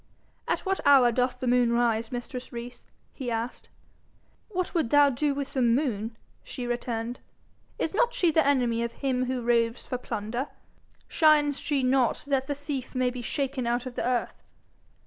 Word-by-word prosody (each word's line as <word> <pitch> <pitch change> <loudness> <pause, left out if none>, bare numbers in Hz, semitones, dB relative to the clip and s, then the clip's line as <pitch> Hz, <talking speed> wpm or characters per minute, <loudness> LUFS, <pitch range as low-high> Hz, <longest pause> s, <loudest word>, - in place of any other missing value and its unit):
'At - - 0
what 385 -1 -1
hour 270 -4 +6
doth 250 +1 0
the 255 - -3
moon 245 -1 +3
rise, 230 -1 +1
mistress 245 +1 -6
Rees?' 240 0 -8 0.3
he 260 -3 -5
asked. 230 +1 -4 0.8
'What 365 -3 -2
would 320 -9 +1
thou 290 +1 +6
with 280 +1 -1
the 265 - 0
moon?" 230 -3 +1 0.3
she 250 - -6
returned. 240 0 -3 0.6
"Is 325 - -2
not 480 +3 +2
she 350 -8 +2
the 320 0 +4
enemy 245 -5 +2
of 235 0 -2
him 255 -2 -1
who 255 -1 -2
roves 230 0 +1
for 250 - -3
plunder? 235 +3 -3 0.6
Shines 295 -3 +4
she 285 -3 0
not 255 -1 +2
that 270 -2 0
the 285 - -2
thief 280 -3 -5
may 255 -1 +1
be 250 0 -6
shaken 265 0 -2
out 240 +1 0
of 255 - -6
the - - -3
earth?' 245 -1 -1
255 Hz, 170 wpm, -27 LUFS, 240-280 Hz, 0.8 s, hour